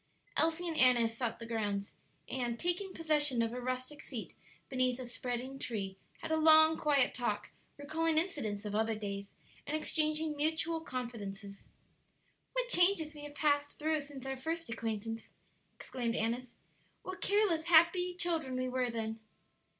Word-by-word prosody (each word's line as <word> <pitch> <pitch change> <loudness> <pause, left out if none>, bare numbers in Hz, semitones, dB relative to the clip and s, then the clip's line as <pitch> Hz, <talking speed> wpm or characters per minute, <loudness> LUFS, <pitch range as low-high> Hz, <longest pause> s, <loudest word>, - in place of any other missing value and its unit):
Elsie 330 +2 +2
and 330 - -1
Annis 240 -4 +5
sought 235 -1 -2
the 230 - -7
grounds, 205 -3 -2 0.3
and, 240 -2 -2
taking 355 +5 -1
possession 295 -8 +3
of 230 0 -2
a 250 - -4
rustic 255 +3 -4
seat 240 -5 -6 0.3
beneath 255 -2 +1
a 255 - -5
spreading 250 +2 -4
tree, 200 -6 -3 0.3
had - - -4
a 315 - +3
long, 315 0 +7
quiet 285 -5 +3
talk, 210 -4 -2 0.3
recalling 310 +2 0
incidents 225 - -1
of 205 - -4
other 220 +1 +1
days, 200 -1 -5 0.4
and 300 +2 0
exchanging 310 0 0
mutual 320 +2 0
confidences. 210 -7 -6 0.9
"What - - 0
changes 355 -7 +4
we 295 -1 -9
have 290 0 -10
passed 290 -1 +1
through 310 0 +1
since 280 -2 -10
our 270 0 -3
first 325 +1 -4
acquaintance 225 0 -3 0.3
!" - - -40
exclaimed 240 -2 -3
Annis. 235 +2 -2 0.5
"What 370 +1 -7
careless, 400 -6 +2
happy 345 +2 +5
children 325 -7 -1
we 255 0 -1
were 255 -1 0
then!" 225 -1 -4
265 Hz, 155 wpm, -33 LUFS, 230-315 Hz, 0.9 s, long